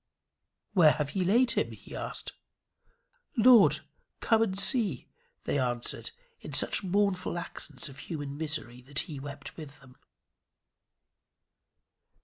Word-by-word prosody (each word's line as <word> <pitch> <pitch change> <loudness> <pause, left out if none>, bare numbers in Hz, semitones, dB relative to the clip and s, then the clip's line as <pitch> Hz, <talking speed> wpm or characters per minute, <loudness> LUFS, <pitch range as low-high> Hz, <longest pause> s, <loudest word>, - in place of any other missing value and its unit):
"Where 165 -6 +6
have 150 -1 -3
ye 190 - +1
laid 235 +7 +3
him?" - - -1
he - - -12
asked. - - -5 1.1
"Lord, 235 -1 +6 0.4
come 225 -1 +2
and 195 -4 0
see," 200 - +5 0.4
they 145 - -1
answered, 120 - -3 0.3
in - - -9
such - - +1
mournful 190 -2 0
accents 155 -4 -4
of 135 -1 -11
human 145 -4 -6
misery 145 -6 -4
that 140 +4 -2
he 150 -4 -7
wept 140 0 -9
with 145 -3 -9
them. 130 -2 -18
155 Hz, 125 wpm, -29 LUFS, 140-195 Hz, 1.1 s, Where